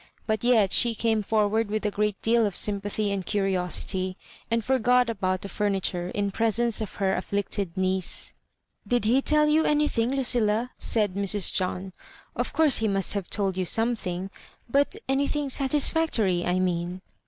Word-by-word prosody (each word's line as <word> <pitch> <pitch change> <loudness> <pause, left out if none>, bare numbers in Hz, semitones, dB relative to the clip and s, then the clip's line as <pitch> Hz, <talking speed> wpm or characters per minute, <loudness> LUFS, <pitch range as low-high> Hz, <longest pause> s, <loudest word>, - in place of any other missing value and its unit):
But 220 0 -1
yet 225 -6 +3
she 235 -2 +3
came 220 -1 0
forward 215 +1 0
with 215 +1 -2
a 210 - +1
great 210 -1 -1
deal 230 -1 +3
of 195 - -5
sympathy 205 0 -1
and 195 -1 -2
curiosity, 185 -1 -1 0.3
and 230 -1 -1
forgot 250 -1 +2
about 185 -3 -2
the - - -5
famiture 190 -3 -2
in 200 -1 -1
presence 230 +2 0
of 215 - -6
her 195 -1 0
afflicted 200 -1 -3
niece. 185 -1 -2 0.3
'' - - -31
Did 245 -3 +1
he 250 +5 +3
tell 300 +1 +3
you 310 +1 +3
anything, 295 -7 +1
Lucilla? 245 -3 +2
" - - -47
said 210 -4 +2
Mrs. 200 -1 +1
John; 185 0 -2 0.2
" - - -26
of - - -2
course 310 -4 +4
he 225 - 0
must 195 -2 0
have 200 -4 -4
told 195 -3 0
you 185 - -1
some 230 +6 +1
thing 185 -2 -5 0.2
— 230 - -26
^but 285 +7 +2
anything 280 +1 0
satisfactory, 265 - +1
I 180 +1 +1
mean." 180 0 -2
210 Hz, 175 wpm, -26 LUFS, 190-240 Hz, 0.3 s, course